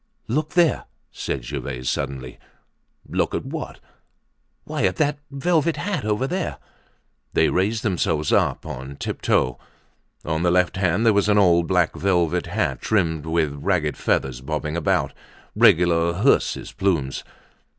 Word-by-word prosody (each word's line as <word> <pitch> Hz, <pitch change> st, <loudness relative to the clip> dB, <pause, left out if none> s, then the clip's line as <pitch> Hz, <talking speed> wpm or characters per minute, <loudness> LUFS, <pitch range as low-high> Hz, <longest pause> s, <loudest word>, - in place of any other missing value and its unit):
"Look 150 Hz, +7 st, -1 dB
there," 175 Hz, -3 st, +3 dB, 0.3 s
said 65 Hz, -3 st, -4 dB
Gervaise 60 Hz, +1 st, -5 dB
suddenly. 65 Hz, -2 st, -3 dB, 0.7 s
"Look -, -, -1 dB
at -, -, -3 dB
what?" -, -, -6 dB, 0.8 s
"Why, -, -, -4 dB
at 90 Hz, -, +1 dB
that 145 Hz, -1 st, 0 dB
velvet 160 Hz, +3 st, +1 dB
hat 180 Hz, -, -2 dB
over 110 Hz, +4 st, 0 dB
there." 180 Hz, +4 st, -3 dB, 0.8 s
They -, -, +3 dB
raised 105 Hz, +5 st, 0 dB
themselves 80 Hz, -, 0 dB
up -, -, +1 dB
on 65 Hz, +2 st, -7 dB
tiptoe. 65 Hz, -2 st, 0 dB, 0.7 s
On 80 Hz, 0 st, -1 dB
the 90 Hz, -, +3 dB
left 90 Hz, +1 st, +2 dB
hand 95 Hz, +3 st, +1 dB
there 110 Hz, -, +5 dB
was 100 Hz, 0 st, +2 dB
an 105 Hz, -, +4 dB
old 85 Hz, -4 st, +4 dB
black 90 Hz, -3 st, +2 dB
velvet 90 Hz, -3 st, +1 dB
hat -, -, -1 dB
trimmed 80 Hz, -7 st, 0 dB
with 80 Hz, -3 st, +1 dB
ragged 75 Hz, -1 st, 0 dB
feathers 65 Hz, -2 st, -1 dB
bobbing 75 Hz, +2 st, -3 dB
about—regular 85 Hz, +1 st, +1 dB
hearse's 105 Hz, +11 st, +1 dB
plumes. 80 Hz, -9 st, -1 dB
90 Hz, 135 wpm, -23 LUFS, 75-110 Hz, 0.8 s, there